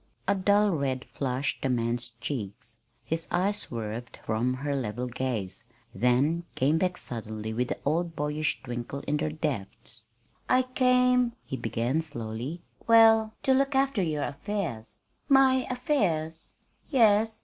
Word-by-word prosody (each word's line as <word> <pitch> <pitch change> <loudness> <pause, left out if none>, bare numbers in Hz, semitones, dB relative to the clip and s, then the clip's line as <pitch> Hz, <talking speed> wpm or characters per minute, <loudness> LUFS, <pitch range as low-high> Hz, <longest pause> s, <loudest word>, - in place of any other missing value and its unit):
A 200 - +4
dull 200 +2 +3
red 135 -5 -1
flushed 135 0 -2
the 135 - 0
man's 120 0 0
cheeks. 115 -3 -5 0.3
His 165 +1 -2
eyes 195 +4 +1
swerved 115 - -5
from 120 +3 0
her 140 +2 -2
level 125 -2 -2
gaze, 120 -6 -3 0.3
then 125 - +2
came 150 +5 +2
back 180 0 0
suddenly 110 -2 -5
with 125 +2 0
the - - -3
old 165 +3 0
boyish 150 +1 -1
twinkle 120 +2 -5
in 150 +1 -1
their 155 +1 -1
depths. 150 -8 -4 0.5
"I 255 0 +5
came," 250 -1 +3
he - - -4
began 120 +5 -1
slowly, 125 +2 -5 0.2
"well, 225 -1 +6
to 265 - +4
look 275 +1 +2
after 270 -5 +2
your 155 -4 -1
affairs." 145 - -4 0.3
"My 265 -1 +5
affairs!" 180 - -1 0.4
"Yes. 220 -4 +4
150 Hz, 140 wpm, -28 LUFS, -, 0.5 s, well